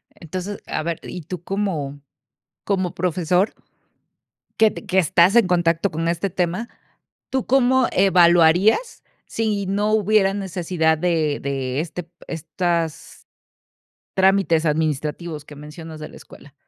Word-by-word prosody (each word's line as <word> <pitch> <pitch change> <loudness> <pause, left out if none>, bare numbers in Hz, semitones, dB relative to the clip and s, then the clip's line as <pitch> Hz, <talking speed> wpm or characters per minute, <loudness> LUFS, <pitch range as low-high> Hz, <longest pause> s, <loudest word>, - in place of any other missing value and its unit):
Entonces, 185 +4 -6
a - - -2
ver, 170 0 -3
y 180 - -7
tú 175 +2 -7
cómo 165 -8 -3 0.6
cómo 185 -3 -1
profesor 180 +3 0 1.0
que 220 -1 +4
que 190 - -2
estás 175 +2 +4
en 235 -5 +6
contacto 175 +1 +1
con 165 +2 -2
este 170 +3 -1
tema, 180 +6 -2 0.6
¿tú 265 -2 -1
cómo 260 -1 +3
evaluarías 180 - +4 0.2
si 210 -3 -2
no 205 +2 0
hubiera 210 -2 +3
necesidad 180 -4 0
de 160 -4 0
de 135 -1 -2
este 165 +1 -6 0.2
estas 165 0 -3 0.9
trámites 190 -4 +3
administrativos 150 +1 -2
que 150 - -13
mencionas 155 +2 -10
de 150 - -6
la - - -14
escuela? 140 - -15
175 Hz, 120 wpm, -21 LUFS, 160-195 Hz, 1.0 s, en